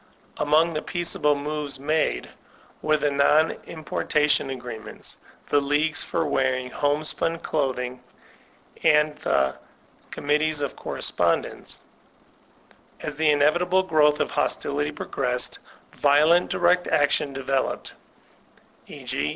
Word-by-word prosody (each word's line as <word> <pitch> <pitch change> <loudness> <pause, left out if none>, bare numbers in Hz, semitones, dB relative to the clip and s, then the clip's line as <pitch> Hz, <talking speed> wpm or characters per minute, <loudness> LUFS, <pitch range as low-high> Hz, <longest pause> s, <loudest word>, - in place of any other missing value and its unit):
Among 155 +3 +3
the 155 - -2
peaceable 170 -4 0
moves 145 -1 -4
made, 155 +3 0 0.5
were 155 0 +2
die 145 -1 +1
non 150 +3 +4 0.2
importation 150 -2 0
agreements, 120 -4 -7 0.3
the 145 - +3
leagues 145 +3 +2
for - - -1
wearing 130 -1 0
home 145 +1 0
spun 155 +2 -1
clothing 130 -5 -2 0.8
and 150 0 +3
the 65 - +1 0.6
''committees 150 +1 0
of 140 - -3
correspondence/* - - -2 1.2
As 150 - -5
the 155 0 +2
inevitable 175 +6 +3
growth 150 -4 +3
of - - -1
hostility 145 +1 -1
progressed, 125 -4 -3 0.3
violent 155 +5 +4
direct 180 +1 +2
action 145 0 +2
developed; 135 0 -2 0.9
e. - - -11
g. 75 - -2
150 Hz, 110 wpm, -24 LUFS, 140-155 Hz, 1.2 s, non